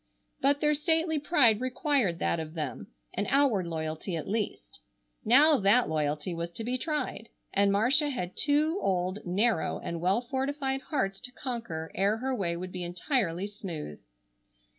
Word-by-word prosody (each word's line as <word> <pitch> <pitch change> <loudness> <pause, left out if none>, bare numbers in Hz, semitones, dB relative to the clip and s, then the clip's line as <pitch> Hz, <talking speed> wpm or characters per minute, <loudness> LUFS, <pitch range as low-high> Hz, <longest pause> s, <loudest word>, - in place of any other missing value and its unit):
But 280 +1 +3
their 300 0 +3
stately 320 +1 +1
pride 255 -8 +4
required 255 - +1
that 170 - 0
of 160 0 -6
them, 155 -2 -4 0.3
an 200 +2 -2
outward 260 -10 +3
loyalty 160 +2 -3
at 160 - -4
least. 200 - -3 0.4
Now 285 +6 +6
that 215 +4 +4
loyalty 150 +2 -1
was 170 0 -4
to 225 - -5
be 245 +3 -1
tried, 295 -4 -3 0.2
and 200 0 +3
Marcia 260 +9 +4
had 185 -10 -4
two 310 +5 +2
old, 185 +1 0
narrow 200 +1 +1
and 170 -1 -5
well 190 +6 +2
fortified 270 +2 -2
hearts 195 -10 -2
to 250 - -8
conquer 230 - -5
ere 200 +3 +1
her 260 +3 -2
way 175 -8 -1
would 185 +1 -6
be 180 - -5
entirely 180 - -1
smooth. 175 - -7
215 Hz, 160 wpm, -29 LUFS, 175-270 Hz, 0.4 s, Now